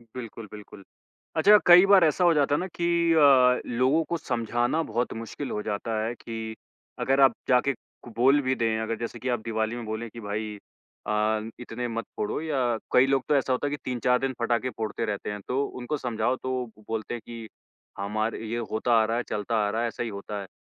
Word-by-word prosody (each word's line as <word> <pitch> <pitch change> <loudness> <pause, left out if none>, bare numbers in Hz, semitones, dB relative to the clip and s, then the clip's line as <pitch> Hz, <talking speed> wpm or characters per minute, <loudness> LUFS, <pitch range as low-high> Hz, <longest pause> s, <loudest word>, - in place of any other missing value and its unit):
बिल्कुल, 115 -3 -7
बिल्कुल। 105 -1 -11 0.5
अच्छा 205 +6 +7
कई 175 +2 +9
बार 195 -2 +6
ऐसा 160 +4 +2
हो 175 -1 +5
जाता 145 -1 +2
है - - 0
ना 185 - -3
कि 170 -1 -3 0.3
अ, 135 -5 +5 0.2
लोगों 140 +6 +3
को 170 - 0
समझाना 120 +2 -1
बहुत 120 +3 -1
मुश्किल 115 +5 -6
हो 105 - -2
जाता 110 +1 -2
है 115 - -2
कि 110 -1 -6 0.5
अगर 135 +1 +2
आप 135 - +6 0.2
जाके 130 +2 +3
क 120 0 -17
बोल 135 +4 +5
भी 130 -1 0
दें, 115 -2 0
अगर 115 +1 -2
जैसे 120 0 -5
कि 130 - -3
आप 120 -2 0
दिवाली 110 0 -1
में 120 -1 -6
बोलें 110 +2 -4
कि 115 - -11
भाई 105 +1 -4 0.5
अ, - - -3
न 110 +1 0
इतने 125 0 -5
मत 115 -1 -4
फोड़ो 105 - -2
या 155 -3 -2 0.4
कई 125 - +6
लोग 135 -1 +2
तो 150 - +4
ऐसा 135 -1 +1
होता 130 +3 -1
है - - -3
कि 145 - -2
3-4 125 0 +1
दिन 135 -1 -1
पटाखे 120 +2 0
फोड़ते 110 +1 -2
रहते 105 -2 -3
हैं। 105 - -5
तो 135 +3 0 0.2
उनको 125 +5 -3
समझाओ 120 -1 -1
तो 130 -1 -2
ब 105 - -18
बोलते 110 +1 -3
हैं 120 - -5
कि 115 -1 -8 0.5
हमारे 110 +3 -2
ये 115 +2 -2
होता 115 +2 +1
आ - - +3
रहा 115 +2 -1
है, 120 - -1
चलता 105 +3 -2
आ - - 0
रहा 110 +3 -1
है, 120 - +1
ऐसा 115 - -4
ही 120 - -3
होता 100 0 -6
है। 100 - -9
120 Hz, 225 wpm, -26 LUFS, 110-135 Hz, 0.5 s, कई